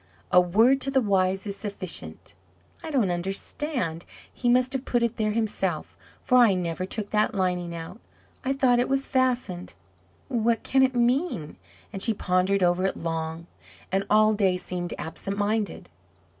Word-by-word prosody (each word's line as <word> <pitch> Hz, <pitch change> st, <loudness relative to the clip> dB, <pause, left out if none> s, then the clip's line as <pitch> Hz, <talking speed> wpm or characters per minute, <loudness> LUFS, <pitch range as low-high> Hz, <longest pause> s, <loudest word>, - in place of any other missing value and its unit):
'A 180 Hz, 0 st, +7 dB
word 225 Hz, +10 st, +3 dB
to 275 Hz, -, 0 dB
the 270 Hz, -1 st, +3 dB
wise 195 Hz, -3 st, +1 dB
is 200 Hz, -1 st, -4 dB
sufficient.' 200 Hz, -4 st, -5 dB, 0.5 s
I 320 Hz, -, -5 dB
don't 245 Hz, -, +1 dB
understand 190 Hz, -, 0 dB, 0.3 s
he 245 Hz, -, -1 dB
must 255 Hz, +1 st, +3 dB
have 265 Hz, -1 st, -2 dB
put 240 Hz, -3 st, 0 dB
it 235 Hz, 0 st, -1 dB
there 215 Hz, -2 st, 0 dB
himself, 195 Hz, -7 st, -2 dB, 0.3 s
for 250 Hz, -, +4 dB
I 225 Hz, -6 st, +5 dB
never 180 Hz, 0 st, -3 dB
took 205 Hz, 0 st, -4 dB
that 215 Hz, +2 st, +1 dB
lining 180 Hz, -2 st, -1 dB
out 165 Hz, +5 st, -8 dB, 0.4 s
I 265 Hz, -, 0 dB
thought 255 Hz, -3 st, +3 dB
it 245 Hz, -, 0 dB
was 270 Hz, 0 st, +1 dB
fastened. 250 Hz, -9 st, -1 dB, 0.5 s
What 235 Hz, -3 st, 0 dB
can 265 Hz, -, +2 dB
it 260 Hz, -1 st, +3 dB
mean?" 240 Hz, -, 0 dB, 0.4 s
and 195 Hz, -, -5 dB
she 225 Hz, +1 st, +2 dB
pondered 185 Hz, +1 st, +1 dB
over 175 Hz, +1 st, +2 dB
it -, -, -4 dB
long, 165 Hz, 0 st, -4 dB, 0.5 s
and 195 Hz, +1 st, +1 dB
all 215 Hz, 0 st, +5 dB
day 195 Hz, -3 st, +2 dB
seemed 180 Hz, -1 st, -4 dB
absent 195 Hz, +4 st, -5 dB
minded. 210 Hz, +1 st, -1 dB
205 Hz, 165 wpm, -26 LUFS, 180-245 Hz, 0.5 s, A